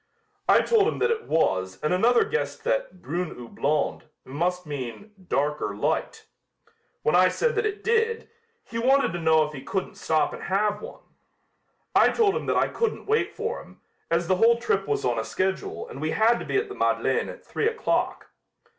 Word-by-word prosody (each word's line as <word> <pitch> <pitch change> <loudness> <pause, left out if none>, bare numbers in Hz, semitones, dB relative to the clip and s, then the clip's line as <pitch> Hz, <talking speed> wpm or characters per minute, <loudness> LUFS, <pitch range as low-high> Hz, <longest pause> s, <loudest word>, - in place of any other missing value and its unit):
"I - - +7
told 440 -3 +3
him - - -1
that 470 - +2
it 455 - -2
was 95 -12 +1
and 150 - +1
another 235 +6 +4
guessed 460 - -3
that - - -2
'brune 170 +1 -3
ou 120 - -8
blonde' 150 +5 -1 0.2
must 175 +6 -2
mean 145 - -6 0.2
'dark 150 +2 0
or 105 - -2
light.' 105 - -2 0.8
When 150 - +2
I 185 +1 +6
said 475 - 0
that 440 -1 +1
it 410 0 -5
did, 460 0 +1 0.4
he 230 - -5
wanted 265 -3 +3
to 175 - -4
know 160 -1 +4
if 150 - -8
he 135 - -7
couldn't 190 +5 -3
stop 155 -2 +1
and - - -8
have 205 +2 0
one. - - -10 0.9
I - - +6
told 415 -4 +2
him - - -3
that - - +2
I - - +3
couldn't 460 -2 -2
wait 440 +2 0
for 455 +2 -3
him, - - -17 0.3
as 170 +1 +1
the 185 0 +2
whole 230 +3 +5
trip 195 -5 -1
was 145 - -1
on 120 -2 +1
a - - -1
schedule 190 +11 -2
and 135 - -9
we 155 - -1
had 225 +6 +3
to - - -6
be - - 0
at 420 +1 0
the 405 - -7
Madeleine - - 0
at - - -11
three 445 - -1
o'clock. 455 0 -1
190 Hz, 200 wpm, -25 LUFS, -, 0.9 s, I